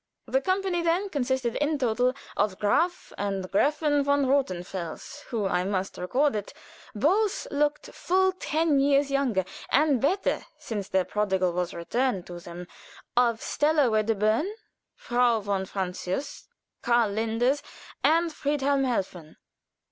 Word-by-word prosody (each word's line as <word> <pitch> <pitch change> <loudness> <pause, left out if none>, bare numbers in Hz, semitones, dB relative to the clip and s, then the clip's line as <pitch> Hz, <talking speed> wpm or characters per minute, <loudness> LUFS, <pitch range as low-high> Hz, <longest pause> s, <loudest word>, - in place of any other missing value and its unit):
The - - +1
company 375 -3 0
then 340 +4 +1
consisted 260 -5 -1
in 295 +1 +1
toto 250 0 +1 0.2
of 200 -2 0
Graf 330 - 0
and 195 -1 -1
Gräfin 290 +5 +2
von 285 0 +2
Rothenfels, 185 - -2
who, 225 -5 -2
I 180 -2 +1
must 190 0 -2
record 265 +9 +1
it, 205 -1 -5 0.4
both 390 - +1
looked 295 +1 0
full 375 +1 +2
ten 320 -5 +1
years 280 0 +3
younger 250 -9 +1 0.2
and 285 -3 +3
better 370 +9 +1 0.2
since 205 -4 -5
their 190 -1 +2
prodigal 190 -4 0
was 180 0 -2
returned 195 +3 -1
to 175 -1 -8
them, 175 +1 -9 0.5
of 235 -2 +2
Stella 295 -4 +2
Wedderburn, 215 - +1 0.5
Frau 240 -1 +2
von 200 -2 -2
Francius, 190 +7 -4 0.3
Karl 235 -3 +2
Linders, 225 +6 +1 0.4
and 330 +1 +3
Friedhelm 280 -2 0
Helfen. 185 -9 -3
245 Hz, 130 wpm, -27 LUFS, 200-290 Hz, 0.5 s, years